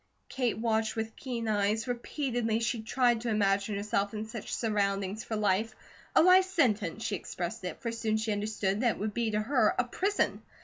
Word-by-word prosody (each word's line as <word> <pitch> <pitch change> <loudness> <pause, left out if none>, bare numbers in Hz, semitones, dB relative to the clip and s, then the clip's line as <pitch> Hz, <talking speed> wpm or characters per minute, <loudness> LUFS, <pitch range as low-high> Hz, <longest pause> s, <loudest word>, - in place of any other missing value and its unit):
Kate 250 -3 -1
watched 220 -1 0
with 225 0 -3
keen 240 -4 -4
eyes. 215 +2 +1
Repeatedly 240 -2 -1
she 230 0 -1
tried 240 +1 +2
to 240 - -2
imagine 200 -1 +1
herself 205 0 -1
in 215 +1 -3
such 220 -1 -7
surroundings 200 -2 -1
for 220 - -4
life, 210 +1 +1 0.4
a - - +7
life 365 +1 +7
sentence, 225 - +1
she 205 - -1
expressed 185 +4 -5
it, 180 - -5
for 230 - -1
soon 225 -1 0
she 220 0 -1
understood 205 -1 -1
that 240 -3 +2
it - - -12
would 210 +1 -3
be 235 0 0
to 210 0 0
her, 230 0 +2
a 250 - +3
prison. 390 +11 0
220 Hz, 190 wpm, -30 LUFS, 210-235 Hz, 0.4 s, a